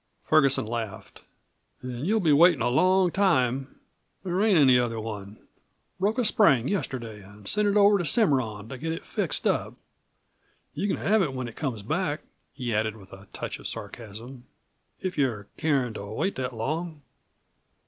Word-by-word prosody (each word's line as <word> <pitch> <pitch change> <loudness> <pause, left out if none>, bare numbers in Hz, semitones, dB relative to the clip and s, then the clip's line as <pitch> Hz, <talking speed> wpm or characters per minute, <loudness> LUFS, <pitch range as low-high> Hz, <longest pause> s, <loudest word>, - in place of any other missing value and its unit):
Ferguson 140 -6 +3
laughed. 110 -3 -6 0.6
"Then 125 +2 -5
you'll 220 +4 +2
be 160 -7 +3
waitin' 160 -4 +5
a 120 - +2
long 185 +6 +3
time. 135 -9 +1 0.4
There 185 0 -1
ain't 210 -4 +4
any 130 -4 +6
'other 115 -2 -1
one. 105 -2 -7 0.6
Broke 205 +5 +1
a 250 - +1
spring 145 - +4
yesterday 120 - -3
an' 105 +1 -16
sent 210 - +1
it 205 +1 +2
over 205 0 +5
to 175 - -2
Cimarron 130 - +1
to 130 - -7
get 160 +3 -2
it 165 - -7
fixed - - -2
up. - - 0 1.0
You 205 - -2
c'n 195 - 0
have 215 +1 +2
it 140 -7 -1
when 130 -1 -3
it 115 - -10
comes 125 -9 -4
back," - - -1 0.3
he 125 -3 -4
added 110 +1 0
with 95 -2 -15
a 95 +1 -13
touch - - -5
of - - -5
sarcasm, 120 +3 -8 0.6
"if 185 -4 -3
you're 115 -7 0
carin' 140 -7 0
to 100 - -7
wait 110 - -2
that 130 -1 -3
long." 155 +6 -4
130 Hz, 170 wpm, -26 LUFS, 115-180 Hz, 1.0 s, any